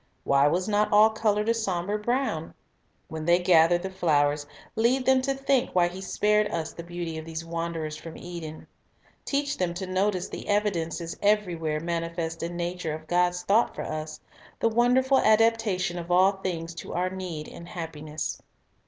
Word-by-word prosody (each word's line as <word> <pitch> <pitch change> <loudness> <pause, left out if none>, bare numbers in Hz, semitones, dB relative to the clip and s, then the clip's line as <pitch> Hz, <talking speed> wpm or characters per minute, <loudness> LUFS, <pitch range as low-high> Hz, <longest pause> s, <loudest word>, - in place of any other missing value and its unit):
Why 140 +1 +4
was 180 +5 0
not 210 0 +2
all 215 +1 +6
colored 215 -1 0
a 230 - +4
somber 205 -2 -1
brown? 240 - -1 0.5
When 160 -1 -6
they 175 +1 +5
gather 175 -1 +5
the 190 +2 -5
flowers, 145 -5 +1 0.3
lead 245 +4 +2
them 265 0 +4
to 275 +1 -1
think 270 -4 0
why 175 -1 +4
He 185 +2 -8
spared 210 +2 +2
us 160 -1 -3
the - - -7
beauty 170 -1 -5
of 160 - -9
these 165 0 -6
wanderers 165 -2 -3
from 165 +1 -9
Eden. 170 -3 -8 0.6
Teach 285 0 -1
them 175 -2 0
to 190 +2 -4
notice 185 0 0
the - - -8
evidences 175 -5 -1
everywhere 175 -7 +1
mani 165 0 -2
fest 165 -1 -4
in 170 +1 -4
nature 175 -2 -3
of 155 0 -10
God's 180 +1 +1
thought 210 +6 +2
for - - -4
us, 155 0 -5 0.4
the 230 - +3
wonderful 250 +4 +3
adaptation 215 -5 +2
of 170 0 -8
all 185 +2 +5
things 175 -4 -4
to - - -8
our 180 +1 0
need 180 -5 -5
and 170 - -10
happiness. 155 -3 -5
175 Hz, 175 wpm, -27 LUFS, 165-210 Hz, 0.6 s, all